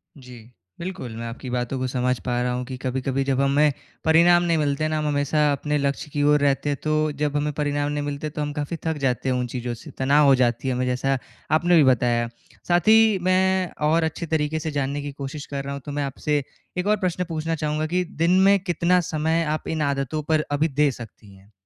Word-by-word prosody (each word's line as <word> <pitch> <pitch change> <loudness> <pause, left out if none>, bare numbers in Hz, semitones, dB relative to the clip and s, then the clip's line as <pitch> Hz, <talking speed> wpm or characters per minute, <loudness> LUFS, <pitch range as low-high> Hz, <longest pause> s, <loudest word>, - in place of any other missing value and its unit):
जी। 125 -3 -12 0.4
बिल्कुल, 165 -11 -6
मैं 115 - -5
आपकी 125 +2 -7
बातों 125 +1 -2
को 130 - -1
समझ 125 0 0
पा 120 -1 0
रहा 125 0 0
हूँ 125 0 -3
कि 130 0 -6
कभी-कभी 130 +1 -2
जब 135 -1 0
हमें 145 +2 +3 0.3
परिणाम 175 +2 +5
नहीं 170 -2 +1
मिलते 150 +1 0
ना, 155 0 -1
हम 150 0 -1
हमेशा 145 +1 +1
अपने 150 +1 -1
लक्ष्य 140 +1 -2
की 145 - 0
ओर 150 0 +4
रहते 145 +1 +1
हैं, 140 - -1
तो, 155 0 +1
जब 145 0 -2
हमें 150 0 0
परिणाम 145 0 -1
नहीं 145 0 -2
मिलते, 145 +1 -4
तो 150 0 -5
हम 145 0 -2
काफ़ी 150 +3 -3
थक 160 -2 -1
जाते 125 +1 -1
हैं 130 - +1
उन 125 0 -1
चीज़ों 120 -1 -3
से, 115 - -11
तनाव 140 +3 +4
हो 135 -1 +6
जाती 125 +1 0
है 130 - +1
हमें, 125 +1 -1
जैसा 130 +2 0 0.3
आपने 175 +3 +4
भी 150 - +6
बताया। 120 -2 +2 0.4
साथ 175 +2 +2
ही 220 -2 +6
मैं 185 -1 +2 0.2
और 165 +1 +3
अच्छे 160 +1 -3
तरीके 155 +1 0
से 155 0 -4
जानने 140 0 -2
की 145 0 -5
कोशिश 140 +1 -7
कर 140 -1 -5
रहा 140 0 -5
हूँ, 140 - -6
तो 145 - -5
मैं 145 0 -2
आपसे 145 +1 -1 0.3
एक 180 +3 -1
और 210 0 +3
प्रश्न 180 -1 -1
पूछना 165 0 -2
चाहूँगा 155 0 -1
कि 180 - +2 0.2
दिन 180 +2 +4
में 200 0 +6
कितना 175 0 +2
समय 160 +2 +1
आप - - -14
इन 160 -1 -2
आदतों 140 +1 -1
पर 155 -1 +2
अभी 150 +3 +2
दे 145 -1 +2
सकती 110 -4 -12
हैं? 95 +3 -21
145 Hz, 235 wpm, -23 LUFS, 130-155 Hz, 0.4 s, हो